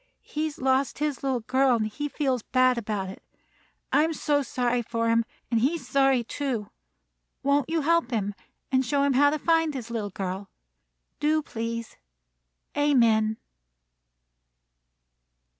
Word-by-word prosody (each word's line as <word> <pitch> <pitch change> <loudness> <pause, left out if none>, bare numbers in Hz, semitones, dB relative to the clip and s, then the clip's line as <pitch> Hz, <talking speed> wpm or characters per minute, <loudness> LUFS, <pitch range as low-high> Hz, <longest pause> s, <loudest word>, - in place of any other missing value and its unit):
He 305 +1 -3
has 305 -2 -5
lost 265 +1 +1
his 295 -3 -2
little 265 -3 0
girl, 260 +2 +3
and 220 -2 0
he 290 +8 -4
feels 265 -5 0
bad 255 +2 +3
about 205 -4 -3
it. 190 - -9 0.7
I'm 305 +4 +3
so 295 -2 +1
sorry 245 -1 0
for 230 0 -1
him, 230 0 +3 0.3
and 230 - +3
he's 300 +8 0
sorry, 270 -3 +3
too. 235 -4 -3 0.7
Won't 280 +1 +2
you 325 0 +1
help 335 -2 +2
him, 205 -4 -1 0.4
and 260 0 +3
show 280 +3 +1
him 280 -1 +2
how 285 +3 +5
to 305 - 0
find 325 -1 +2
his 235 -3 -6
little 215 -3 -2
girl? 190 0 -5 0.7
Do, 310 +1 +2
please. 230 -2 -5 0.8
Amen." 230 -7 +3
260 Hz, 140 wpm, -26 LUFS, 230-290 Hz, 0.8 s, how